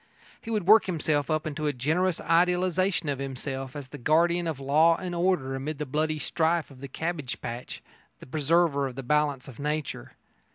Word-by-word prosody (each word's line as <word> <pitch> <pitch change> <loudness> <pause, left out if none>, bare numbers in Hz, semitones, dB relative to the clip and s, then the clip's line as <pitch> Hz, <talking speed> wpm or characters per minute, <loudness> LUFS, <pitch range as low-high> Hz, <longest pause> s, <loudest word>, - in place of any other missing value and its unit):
He 225 - -9
would 215 -5 -1
work 215 +2 +7
himself 155 -5 0
up 155 0 0
into 155 0 -3
a 145 - 0
generous 160 +8 0
idealisation 180 +1 +2
of 140 -2 -1
himself 135 0 -5
as 140 -3 -7
the 145 - -9
guardian 170 +5 +2
of 155 -5 -3
law 155 +5 +4
and 180 -2 -5
order 170 -7 +1
amid 140 +3 -4
the 150 - -3
bloody 155 +3 -1
strife 160 0 0
of 130 -1 -14
the 140 - -6
cabbage 155 -1 -4
patch 120 +1 -7 0.4
the - - -11
preserver 150 0 +2
of 130 - -8
the 135 - -6
balance 145 0 0
of 130 -4 -11
nature. 150 - -3
155 Hz, 190 wpm, -27 LUFS, 135-170 Hz, 0.4 s, work